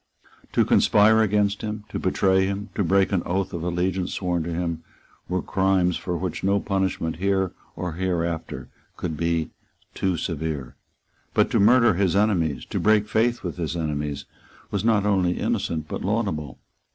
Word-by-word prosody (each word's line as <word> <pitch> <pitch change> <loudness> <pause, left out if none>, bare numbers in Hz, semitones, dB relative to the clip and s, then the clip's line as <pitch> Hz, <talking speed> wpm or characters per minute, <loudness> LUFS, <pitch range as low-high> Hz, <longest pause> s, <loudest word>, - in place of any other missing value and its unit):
To - - +3
conspire 110 +2 +5
against 105 -1 +1
him, 105 -1 -4
to - - -4
betray 95 0 +2
him, 100 +2 -4
to 105 - 0
break 95 +2 +3
an 95 -3 +1
oath 95 +1 -2
of 85 - -3
allegiance 90 +2 -1
sworn 90 -2 -1
to 85 +2 -4
him, 85 -1 -3 0.5
were 90 0 -1
crimes 95 -2 +2
for 90 -1 -3
which 90 -1 -4
no 100 +1 +3
punishment 95 -5 -1
here 95 0 +1 0.2
or 90 -1 -3
hereafter 85 -2 -2 0.3
could 80 -3 -3
be 85 0 -1 0.4
too 95 -3 0
severe. 80 -5 -4 0.6
But - - +3
to - - +3
murder 115 +1 +5
his 95 0 +1
enemies, 85 - +1
to - - -1
break 105 -1 +3
faith 120 +3 +1
with 90 -2 -4
his 85 -1 -3
enemies 75 -3 -3 0.5
was 100 -1 -1
not 110 -3 +3
only 95 -4 +2
innocent 80 -2 -1
but - - -5
laudable. 95 - -2
95 Hz, 165 wpm, -24 LUFS, 85-100 Hz, 0.6 s, conspire